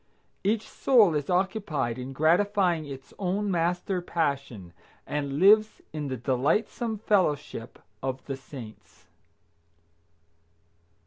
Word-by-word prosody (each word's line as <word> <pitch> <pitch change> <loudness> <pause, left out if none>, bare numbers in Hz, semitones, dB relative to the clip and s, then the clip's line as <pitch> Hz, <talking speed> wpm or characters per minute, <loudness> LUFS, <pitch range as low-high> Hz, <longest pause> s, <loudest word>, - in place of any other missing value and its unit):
Each 215 +2 0
soul 225 -10 +4
is 145 -2 -2
occupied 180 - 0
in 125 +1 -6
gratifying 175 +2 +2
its 135 -2 -9
own 200 +2 -1
master 175 +2 0
passion, 140 - -2 0.3
and 140 -1 -3
lives 215 +5 +5
in 150 -2 -3
the 130 -1 -3
delightsome 150 - 0
fellowship 150 - 0 0.2
of 130 0 -4
the 135 - -3
saints. 130 -5 -12
160 Hz, 105 wpm, -27 LUFS, 135-195 Hz, 0.3 s, lives